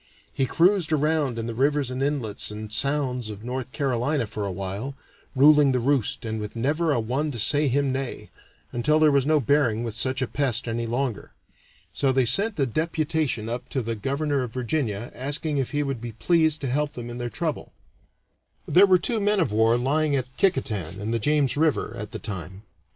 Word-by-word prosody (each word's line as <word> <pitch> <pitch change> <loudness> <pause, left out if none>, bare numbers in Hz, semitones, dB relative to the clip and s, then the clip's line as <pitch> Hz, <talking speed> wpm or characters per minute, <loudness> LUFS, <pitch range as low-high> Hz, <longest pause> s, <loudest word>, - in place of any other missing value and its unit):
He 135 -2 0
cruised 175 0 +3
around 150 -4 +1
in 115 - -3
the 115 - -4
rivers 140 +2 +1
and 130 +1 -4
inlets 135 -7 -1
and 105 0 -6
sounds 125 -2 0
of 105 0 -8
North 125 +1 -4
Carolina 135 -1 0
for 105 -1 -4
a - - -3
while, 100 +8 -5 0.4
ruling 145 0 +6
the 125 - +1
roost 130 -2 0
and 110 0 -3
with 105 +1 -6
never 150 +7 0
a 130 - +2
one 130 +7 -1
to 130 - -5
say 145 +7 +3
him 140 +1 +1
nay, 135 -1 -5 0.4
until 120 +6 +2
there 155 -1 +5
was 140 -1 +2
no 155 -1 +4
bearing 125 -4 +2
with 115 -2 -4
such 130 +4 0
a - - -2
pest 130 -4 -1
any 115 0 -2
longer. 120 -2 -3 0.6
So 135 -2 +1
they 130 -1 +2
sent 200 - +2
a 135 - +3
deputation 155 -3 -1
up 120 +2 -5
to 130 - -2
the 115 +1 -2
Governor 140 +5 -1
of 120 -3 -5
Virginia 120 -4 -2
asking 145 +3 -1
if 130 - -1
he 145 -1 -1
would 135 -5 -3
be 120 -1 -6
pleased 160 +4 +2
to 140 - -2
help 145 +3 -1
them 120 -1 -7
in 120 - -7
their 120 0 -3
trouble. 155 +3 -3 1.0
There 195 +3 +6
were 185 -1 +6
two 225 +6 -1
men 205 0 +2
of 165 - +1
war 110 +2 +3
lying 145 +4 +1
at 130 -1 -3
Kicquetan, 105 - -1
in 105 +2 -3
the 115 - 0
James 145 +3 +1
River, 155 0 +1
at 105 0 -6
the - - -6
time. 95 -1 -7
130 Hz, 205 wpm, -25 LUFS, 115-150 Hz, 1.0 s, ruling